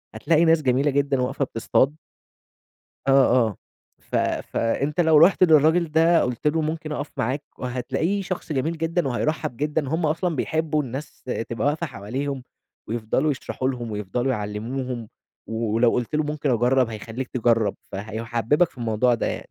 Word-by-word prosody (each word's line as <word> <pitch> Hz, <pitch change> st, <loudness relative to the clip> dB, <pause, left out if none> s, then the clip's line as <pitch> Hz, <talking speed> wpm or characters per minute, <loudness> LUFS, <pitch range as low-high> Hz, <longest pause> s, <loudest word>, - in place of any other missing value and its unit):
هتلاقي 165 Hz, 0 st, +3 dB
ناس 165 Hz, -1 st, +4 dB
جميلة 135 Hz, +2 st, +2 dB
جدًا 140 Hz, -1 st, +1 dB
واقفة 135 Hz, +2 st, -1 dB
بتصطاد 130 Hz, +5 st, +1 dB, 1.1 s
آه، -, -, +5 dB, 0.4 s
آه. 105 Hz, -, -7 dB, 0.5 s
ف -, -, -4 dB, 0.4 s
فأنت 140 Hz, +8 st, 0 dB
لو 160 Hz, -2 st, +5 dB
رُحت 185 Hz, +3 st, +5 dB
للراجل 160 Hz, +1 st, +4 dB
ده 165 Hz, +1 st, +4 dB
قُلت 125 Hz, +4 st, -3 dB
له 160 Hz, +2 st, +2 dB
ممكن 155 Hz, 0 st, -3 dB
أقَف 145 Hz, 0 st, -4 dB
معاك 130 Hz, +6 st, -1 dB, 0.2 s
وهتلاقيه 130 Hz, +10 st, -1 dB
شخص 180 Hz, -3 st, -4 dB
جميل 155 Hz, +4 st, -1 dB
جدًا 165 Hz, -2 st, 0 dB
وهيرحّب 130 Hz, -1 st, -1 dB
جدًا، 150 Hz, 0 st, -1 dB
هم 160 Hz, +1 st, 0 dB
أصلًا 165 Hz, +1 st, 0 dB
بيحبّوا 155 Hz, +1 st, 0 dB
الناس 135 Hz, +3 st, -7 dB
ت 130 Hz, -, -7 dB
تبقى 115 Hz, +3 st, -2 dB
واقفة 155 Hz, +3 st, 0 dB
حواليهم 130 Hz, +5 st, -4 dB, 0.5 s
ويفضلوا 120 Hz, +6 st, 0 dB
يشرحوا 130 Hz, -1 st, -3 dB
لهم 120 Hz, -3 st, -4 dB
ويفضلوا 105 Hz, +6 st, -1 dB
يعلموهم، 115 Hz, +3 st, -4 dB, 0.4 s
ولو 115 Hz, +1 st, +1 dB
قُلت 125 Hz, +4 st, -2 dB
له 155 Hz, -, +2 dB
ممكن 150 Hz, -2 st, -1 dB
أجرّب 125 Hz, +1 st, +3 dB
هيخلّيك 115 Hz, +4 st, -6 dB
تجرّب، 115 Hz, -4 st, +1 dB, 0.2 s
فهيٌحبِّبك 115 Hz, -, 0 dB
في -, -, -19 dB
الموضوع 120 Hz, +1 st, +2 dB
ده -, -, -2 dB
يعني. -, -, -2 dB
135 Hz, 155 wpm, -24 LUFS, 120-155 Hz, 1.1 s, آه